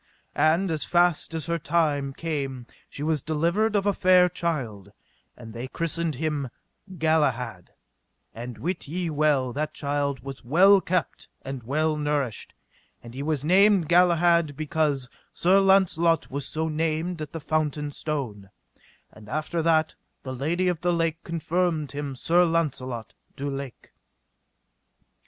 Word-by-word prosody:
And 165 +4 +2
as 155 -2 -1
fast 175 -2 +2
as 160 -3 -3
her 170 0 -1
time 150 -3 0
came 135 -6 -4 0.2
she 145 - -7
was 155 -2 0
delivered 170 - 0
of 200 -1 +1
a 205 - +3
fair 180 -1 +5
child, 125 - -4 0.5
and 115 -2 -11
they 120 +3 -5
christened 165 +1 -1
him 150 -2 -2 0.5
Galahad; 130 - 0 0.6
and 120 +1 -7
wit 175 0 -4
ye 170 +2 -3
well 145 -4 +1
that 150 +3 -3
child 140 -2 -2
was 135 0 -8
well 190 +10 +5
kept 180 -1 -2 0.2
and 135 -1 -6
well 155 +6 0
nourished, 145 -6 -2 0.5
and 120 0 -11
he 135 - -5
was 150 -1 -1
named 190 -1 +4
Galahad 170 -3 +4
because 150 -4 0 0.3
Sir 185 +3 +4
Launcelot 180 -4 +3
was 140 0 -3
so 160 +1 -2
named 160 +2 -2
at 150 -1 -6
the 165 - -5
fountain 150 -1 -1
stone; 125 -11 -4 0.6
and 105 -1 -14
after 155 +4 -2
that 160 -1 +2 0.3
the 130 - -5
Lady 165 +8 -1
of 175 -3 0
the 175 0 +1
Lake 165 -1 -1
confirmed 165 -3 -1
him 140 -1 -5
Sir 170 +7 +3
Launcelot 130 -9 -2 0.2
du 140 +1 -4
Lake. 135 -2 -7
155 Hz, 140 wpm, -25 LUFS, 140-170 Hz, 0.6 s, fair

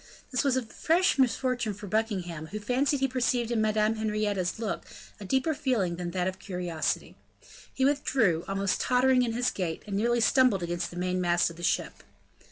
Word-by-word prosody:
This 250 - +1
was 270 -2 +2
a 260 - 0
fresh 325 +8 +1
misfortune 250 -4 +1
for 205 - -9
Buckingham, 185 -7 -2
who 210 +6 -5
fancied 260 +6 0
he 270 - +3
perceived 245 -2 0
in 230 -2 +1
Madame 215 0 +1
Henrietta's 210 -4 -1
look 220 -2 -3 0.4
a 205 - -8
deeper 265 - +1
feeling 240 - 0
than 175 -1 -4
that 180 +1 -1
of 190 0 -4
curiosity. 180 -4 -3 0.6
He 265 - 0
withdrew, 255 - +2
almost 195 0 0
tottering 255 0 +3
in 235 -2 0
his 245 +1 +1
gait, 170 -4 -3
and 200 - -4
nearly 235 +4 +2
stumbled 235 -5 +3
against 175 0 -2
the 175 - -10
mainmast 180 -1 +1
of - - -12
the 170 - -11
ship. 175 - -1
215 Hz, 180 wpm, -28 LUFS, 180-250 Hz, 0.6 s, he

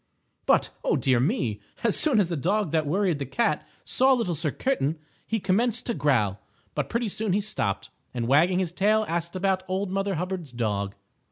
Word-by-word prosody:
But, - - +3
oh, - - +2
dear 130 -2 +3
me! 125 - 0 0.2
As 230 -3 +3
soon 280 -8 +3
as 185 -4 +2
the 170 - -1
Dog 190 +4 0
that 155 -2 +1
Worried 180 -1 +1
the 140 - -2
Cat 235 - 0 0.2
saw 265 +1 +4
Little 230 -9 0
Sir 155 0 -1
Kitten, 160 - 0 0.3
he 225 - 0
commenced 225 +5 +1
to 235 - 0
growl. 120 - +1 0.3
But - - -2
pretty 235 0 0
soon 210 -1 -1
he 200 - +3
stopped, 195 - -2 0.2
and, 120 -2 -2
wagging 165 +8 +4
his 185 -3 0
tail, 215 +4 +2
asked 170 +1 -2
about 190 0 +1
Old 190 +1 -2
Mother 195 0 0
Hubbard's 175 -5 -4
dog. 100 -4 -2
180 Hz, 190 wpm, -26 LUFS, 145-210 Hz, 0.3 s, saw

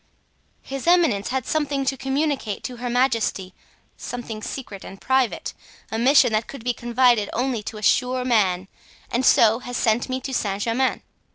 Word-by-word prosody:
"His 275 +3 -6
eminence 330 - +3
had 260 0 -2
something 290 -3 -1
to 270 - 0
communicate 270 -4 -2
to 250 - -6
her 245 +1 -4
majesty, 230 -7 0 0.4
something 235 -3 -6
secret 215 -5 -7
and 195 - -10
private—a 260 -3 -2
mission 260 0 +5
that 215 +1 0
could 275 -5 -9
be 245 0 0
confided 240 -3 +2
only 245 -2 -1
to 215 +1 -7
a 210 - -9
sure 250 +1 +2
man—and 205 +2 -1
so 225 -2 +5
has 245 -1 -5
sent 230 +3 +1
me 255 0 -1
to 265 - -5
Saint 205 -4 -1
Germain. 250 +3 0
245 Hz, 160 wpm, -23 LUFS, 220-265 Hz, 0.4 s, mission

